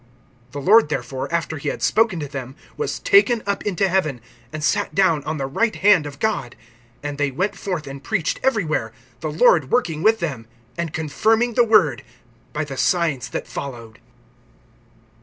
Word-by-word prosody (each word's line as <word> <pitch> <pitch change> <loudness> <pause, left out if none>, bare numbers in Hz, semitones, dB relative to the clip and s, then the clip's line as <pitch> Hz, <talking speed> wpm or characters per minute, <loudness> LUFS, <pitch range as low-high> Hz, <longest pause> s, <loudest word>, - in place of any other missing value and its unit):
(19)The 145 -1 -6
Lord 215 -4 +6
therefore, 135 -2 -4
after 160 -2 -2
he - - -2
had - - -5
spoken 220 -6 +2
to 145 - -4
them, 135 -1 -7 0.2
was 445 - -3
taken 250 - +4
up 200 0 -2
into 195 0 +1
heaven, 170 -9 0 0.3
and 155 -1 -6
sat 205 +5 0
down 170 -7 +3
on 155 +1 -2
the 135 - -2
right 220 +12 0
hand 195 -6 +4
of 145 0 -9
God; 145 - -2 0.5
(20)and 145 -1 -4
they 145 -1 +1
went 180 +10 -2
forth, 180 -6 -4
and 135 0 -9
preached 180 -2 -1
everywhere, 175 - 0 0.3
the 155 - -3
Lord 155 - +4
working 165 -11 0
with 220 +4 +4
them, 135 - -4 0.3
and 170 -2 -3
confirming 220 - +1
the 240 - +4
word 200 - +3 0.5
by 150 +5 -2
the 140 -3 -7
signs 160 -9 +1
that - - -4
followed. 115 -5 -8
160 Hz, 175 wpm, -21 LUFS, 140-205 Hz, 0.5 s, Lord